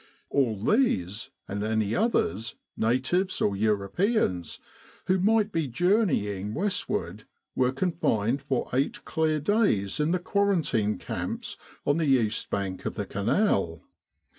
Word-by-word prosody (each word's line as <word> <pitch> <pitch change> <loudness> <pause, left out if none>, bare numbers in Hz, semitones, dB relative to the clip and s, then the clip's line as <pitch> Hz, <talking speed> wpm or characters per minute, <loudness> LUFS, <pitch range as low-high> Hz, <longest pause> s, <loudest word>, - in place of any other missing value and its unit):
All 125 -7 +2
these, 110 - +1 0.2
and 100 +1 -3
any 110 -1 0
others, 115 - 0 0.2
natives 130 - +1
or 100 - +1
Europeans, 100 - 0 0.5
who 185 +1 +2
might 215 +2 +3
be 165 -5 0
journeying 120 - +1
westward, 165 - -2 0.3
were 125 -1 +2
confined 135 - 0
for 135 -3 -1
eight 135 +3 -1
clear 155 -1 +1
days 150 - +1
in 150 +1 +2
the 180 - +2
quarantine 175 - +1
camps - - -4 0.3
on 145 +2 +2
the 160 -2 +1
east 120 -5 +2
bank 95 -2 -3
of - - -4
the 105 - -3
Canal. 100 - 0
130 Hz, 125 wpm, -27 LUFS, -, 0.5 s, might